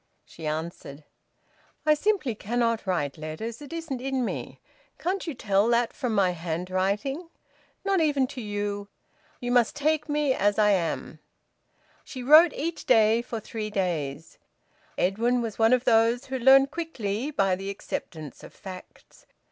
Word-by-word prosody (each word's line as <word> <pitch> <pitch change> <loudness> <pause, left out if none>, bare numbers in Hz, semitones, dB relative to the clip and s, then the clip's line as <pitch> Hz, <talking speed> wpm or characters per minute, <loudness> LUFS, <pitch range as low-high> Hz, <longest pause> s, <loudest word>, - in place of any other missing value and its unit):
She 160 -2 -8
answered: 155 -2 -5 0.8
"I 305 - +6
simply 330 - 0
cannot 230 0 -1
write 155 -6 -1
letters. 190 - -6
It 290 - -10
isn't 320 -6 -4
in 265 -1 -1
me. - - -5 0.4
Can't 370 +1 -2
you 315 - -3
tell 200 -2 +2
that 235 0 +2
from 245 -5 -2
my 190 -3 +3
handwriting? 185 - -2 0.6
Not 390 -3 +2
even 290 -4 +2
to 255 - -7
you! 205 -1 -3 0.5
You 245 0 -3
must 245 -2 +3
take 305 +1 0
me 295 -2 +2
as 205 -3 +1
I 210 -1 +4
am." 175 -4 -1 0.8
She 255 -2 -8
wrote 310 +5 +8
each 330 +3 -4
day 225 -1 +5
for 235 -2 -5
three 215 0 -5
days. 160 -7 -3 0.6
Edwin 230 +7 +1
was 230 -2 -4
one 225 +1 +5
of 255 0 +3
those 235 +2 +3
who 260 0 -4
learn 265 +2 +7
quickly, 275 -7 -3
by 195 -10 +1
the 195 +1 -6
acceptance 160 -6 -6
of - - -12
facts. 185 -2 -12
230 Hz, 150 wpm, -26 LUFS, 195-270 Hz, 0.8 s, wrote